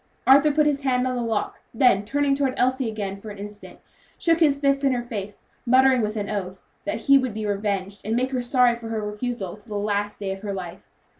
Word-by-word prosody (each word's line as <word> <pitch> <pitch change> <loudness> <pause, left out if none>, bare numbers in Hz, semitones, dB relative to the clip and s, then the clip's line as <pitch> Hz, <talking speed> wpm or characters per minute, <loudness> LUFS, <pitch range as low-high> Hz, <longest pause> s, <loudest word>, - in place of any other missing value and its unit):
Arthur 280 +3 +6
put 300 +1 +3
his 290 -2 +1
hand 255 -2 +1
on 255 0 -1
the 245 - -2
lock; 225 -3 -2 0.2
then, 225 -5 +4
turning 280 +5 +1
toward 275 -2 0
Elsie 255 -1 +1
again, 200 -2 -5
for 215 - -8
an 205 - -9
instant, 205 +1 -10 0.4
shook 330 -1 +2
his 295 -4 +4
fist 275 0 +1
in 270 -1 +3
her 245 -1 -2
face, 205 -4 -7 0.2
muttering, 260 0 +4
with 215 0 -2
an 205 -1 -2
oath, 190 -3 -4 0.3
that 310 - -3
he 275 -1 +6
would 255 -5 -3
be 215 -1 -3
revenged, 200 -1 -2
and 220 +2 -1
make 255 +2 0
her 255 -2 -1
sorry 245 -1 +3
for 235 -1 -9
her 220 -2 -3
refusal 210 -3 -4
to 210 +2 -20
the 205 - -3
last 205 0 -1
day 195 -2 -3
of 195 0 -6
her 205 -1 -4
life. 180 -1 -8
230 Hz, 235 wpm, -24 LUFS, 205-265 Hz, 0.4 s, Arthur